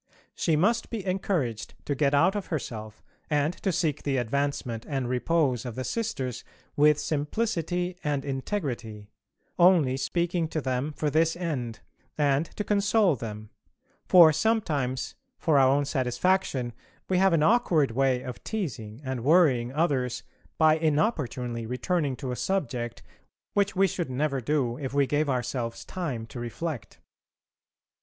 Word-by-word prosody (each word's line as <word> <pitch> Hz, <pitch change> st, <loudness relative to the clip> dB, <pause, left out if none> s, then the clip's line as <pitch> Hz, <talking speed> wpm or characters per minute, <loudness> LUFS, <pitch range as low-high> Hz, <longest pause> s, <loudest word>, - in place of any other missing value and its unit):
She 165 Hz, -, +1 dB
must 205 Hz, +10 st, +2 dB
be 220 Hz, -5 st, -4 dB
encouraged 180 Hz, -, -2 dB
to 145 Hz, -, 0 dB
get 140 Hz, 0 st, +2 dB
out 170 Hz, +8 st, +4 dB
of 205 Hz, -2 st, -3 dB
herself, 110 Hz, -9 st, -5 dB, 0.3 s
and 150 Hz, +2 st, +1 dB
to 195 Hz, -, +1 dB
seek 160 Hz, -4 st, 0 dB
the 140 Hz, -2 st, 0 dB
advancement 125 Hz, -1 st, -1 dB
and 135 Hz, -4 st, -1 dB
repose 130 Hz, 0 st, +1 dB
of 120 Hz, -3 st, -6 dB
the 130 Hz, -, -3 dB
Sisters 130 Hz, -, -3 dB, 0.3 s
with 150 Hz, 0 st, +5 dB
simplicity 175 Hz, +2 st, -1 dB
and 145 Hz, -2 st, -1 dB
integrity: 130 Hz, -, -4 dB, 0.5 s
only 170 Hz, -8 st, +5 dB
speaking 170 Hz, +3 st, 0 dB
to 155 Hz, -, -2 dB
them 130 Hz, +1 st, -1 dB
for 150 Hz, 0 st, -2 dB
this 165 Hz, +2 st, +2 dB
end, 135 Hz, -10 st, -4 dB, 0.4 s
and 145 Hz, +1 st, +2 dB
to 210 Hz, -, -2 dB
console 205 Hz, -3 st, +3 dB
them: 110 Hz, -3 st, -7 dB, 0.6 s
for 170 Hz, -4 st, +8 dB
sometimes 150 Hz, -, 0 dB, 0.2 s
for 150 Hz, -4 st, +3 dB
our 130 Hz, -1 st, +5 dB
own 140 Hz, +1 st, +2 dB
satisfaction 135 Hz, -1 st, 0 dB, 0.3 s
we 185 Hz, -1 st, +2 dB
have 190 Hz, -1 st, +4 dB
an 155 Hz, -2 st, +3 dB
awkward 165 Hz, -, +3 dB
way 130 Hz, +1 st, +1 dB
of 125 Hz, -2 st, -7 dB
teasing 130 Hz, -, -4 dB
and 130 Hz, -3 st, -3 dB
worrying 135 Hz, -6 st, +4 dB
others 135 Hz, -5 st, 0 dB, 0.3 s
by 155 Hz, -1 st, +5 dB
inopportunely 145 Hz, -, -1 dB
returning 140 Hz, +3 st, -1 dB
to 130 Hz, -1 st, -5 dB
a -, -, -2 dB
subject 125 Hz, -, -2 dB, 0.5 s
which 200 Hz, 0 st, +1 dB
we 195 Hz, +1 st, +4 dB
should 175 Hz, -5 st, -2 dB
never 135 Hz, +1 st, -1 dB
do 125 Hz, -1 st, 0 dB
if 135 Hz, -1 st, -4 dB
we 140 Hz, -1 st, +4 dB
gave 145 Hz, +2 st, 0 dB
ourselves 125 Hz, -2 st, -2 dB
time 145 Hz, -12 st, -4 dB
to 120 Hz, -, -9 dB
reflect. 120 Hz, +1 st, -5 dB
145 Hz, 145 wpm, -27 LUFS, 125-170 Hz, 0.6 s, for